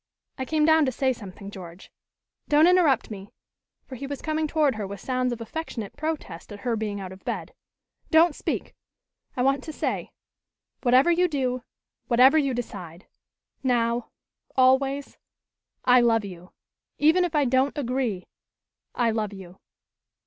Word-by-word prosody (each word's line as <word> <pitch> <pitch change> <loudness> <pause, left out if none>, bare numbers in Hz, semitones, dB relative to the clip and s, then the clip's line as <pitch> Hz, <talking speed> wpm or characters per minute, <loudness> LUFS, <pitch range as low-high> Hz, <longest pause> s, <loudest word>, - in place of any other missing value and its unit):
I 260 - -2
came 305 +2 +1
down 315 -1 +5
to - - +1
say 260 +1 +1
something, 200 -3 -10
George. 180 -2 -11 0.6
Don't 300 +2 +5
interrupt 340 -10 +3
me 200 -1 -8 0.3
" - - -56
for - - -11
he 275 +2 -6
was 285 -1 -5
coming 310 0 -1
toward 300 -3 +2
her 215 -3 -4
with 200 0 -7
sounds 255 +3 -1
of 240 - -4
affectionate 230 -4 -6
protest 295 - -5
at 205 0 -9
her 240 -2 0
being 210 -2 -3
out 190 -1 -7
of 190 0 -13
bed. - - -4 0.6
"Don't 325 0 +5
speak! - - -4 0.6
I 250 - +1
want 275 +1 +2
to 315 - -6
say - - -3 0.7
whatever 260 +6 +5
you 355 +1 +3
do, 255 -5 -1 0.5
whatever 260 +6 +6
you 275 -4 0
decide 185 -7 -7 0.6
now 235 -2 0 0.5
always 270 +2 +2 0.7
I 250 0 +6
love 225 -3 +3
you. 180 -2 -10 0.5
Even 320 +5 +4
if 345 -3 -2
I 295 -2 +3
don't 260 +3 +1
agree, 250 -8 -2 0.7
I 235 -2 +2
love 215 -2 -2
you." 190 -2 -12
255 Hz, 155 wpm, -25 LUFS, 210-290 Hz, 0.7 s, whatever